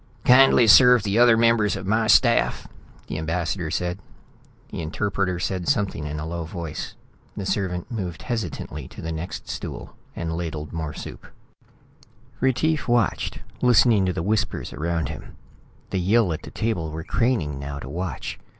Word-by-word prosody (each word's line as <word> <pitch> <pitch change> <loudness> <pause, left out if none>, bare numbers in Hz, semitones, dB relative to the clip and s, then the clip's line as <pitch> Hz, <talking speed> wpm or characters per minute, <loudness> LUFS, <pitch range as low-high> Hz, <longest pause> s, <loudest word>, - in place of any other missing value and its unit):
"Kindly 125 -1 +7
serve 125 +2 +7
the 105 +2 +1
other 120 -2 +6
members 115 -3 +3
of - - -6
my 110 +3 +1
staff," 120 0 +3 0.4
the 75 - -5
ambassador 85 +1 -2
said. 90 +3 -2 0.7
The - - -5
interpreter 90 +3 -1
said 90 -1 -2
something 95 -8 0
in 75 +1 -4
a 75 - -4
low 85 +1 -4
voice. 80 -1 -6 0.4
The 100 - -4
servant 95 -2 -2
moved 90 -8 -5
hesitantly 90 - -4
to - - -11
the 80 - -3
next 80 +2 -6
stool - - -7 0.2
and 80 -1 -3
ladled 80 -3 -5
more 80 -3 -4
soup. - - -9 1.1
Retief 145 +5 +1
watched, 120 -3 0 0.2
listening 115 -5 +4
to 90 - 0
the 80 - -3
whispers 100 +1 -1
around 80 -1 -2
him. - - -9 0.6
The 95 - 0
Yill 100 0 +3
at 80 - -6
the - - -10
table 110 -8 -2
were 80 +1 -6
craning 100 - 0
now 70 0 -5
to 70 - -8
watch. 85 +5 -5
90 Hz, 160 wpm, -24 LUFS, 80-115 Hz, 1.1 s, Kindly